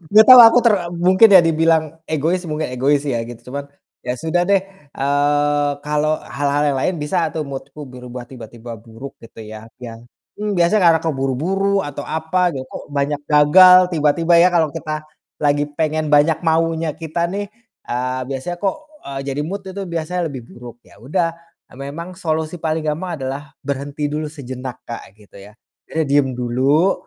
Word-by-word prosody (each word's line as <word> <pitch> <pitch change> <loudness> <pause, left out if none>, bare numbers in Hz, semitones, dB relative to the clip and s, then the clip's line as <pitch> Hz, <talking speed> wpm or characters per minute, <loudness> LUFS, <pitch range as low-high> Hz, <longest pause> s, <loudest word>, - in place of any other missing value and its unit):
gak 215 0 +9
tau 255 -1 +11
aku 230 - +4
ter 230 - +6 0.2
mungkin 185 +5 +5
ya 185 - +9
dibilang 165 -1 +2 0.3
egois, 160 +4 0
mungkin 155 -1 -3
egois 140 +3 +2
ya - - 0
gitu, 120 +1 -11
cuman 140 +2 -5 0.4
ya 125 - -1
sudah 160 +7 -1
deh, 200 +1 +3 0.3
eee, 145 +1 +1
kalau 150 +1 0
hal-hal 145 +1 -1
yang 135 - -2
lain 185 - 0
bisa 150 +5 -2
atau 160 - -4
mood-ku 140 +1 -8
berubah 125 0 -9
tiba-tiba 120 -2 -10
buruk 115 +5 -11
gitu 115 0 -12
ya. 110 0 -10 0.2
Bia 115 -2 -8 0.4
mmm, 210 0 -3
biasanya 175 +4 +3
karena 165 -1 +5
keburu-buru 165 +8 -1
atau 145 0 -6
apa, 170 +3 -1
ya 135 - -4
kok - - -8
banyak 145 +1 -1
gagal 180 +5 +8 0.2
tiba-tiba 165 +2 +2
ya, 170 +2 +6
kalau 165 -3 +2
kita 155 +2 -5 0.4
lagi 145 0 +2
pengen 155 +1 -1
banyak 150 +2 +4
maunya 165 -1 +1
kita 165 +2 -3
nih, 205 0 -4 0.4
eee, 125 +1 -2
biasanya 135 +6 -4
kok, 195 -2 0 0.3
eee, 135 -1 -6
jadi 140 +1 -3
mood 200 +3 -5
itu 190 +1 -6
biasanya 170 +2 -3
lebih 130 - -7
buruk. 120 0 -12
Ya - - -20
udah, 165 +6 -1 0.4
memang 145 +7 -7
solusi 160 -2 -2
paling 160 0 -2
gampang 165 +3 -3
adalah 135 +1 -4 0.2
berhenti 140 +1 -4
dulu 150 +1 -4
sejenak 130 -3 -8
Kak, 115 - -6 0.2
gitu 100 -1 -16
ya. 105 - -22 0.3
Jadi 160 - -1
diem 145 -2 +3
dulu, 135 +9 +2
150 Hz, 170 wpm, -19 LUFS, 135-170 Hz, 0.4 s, tau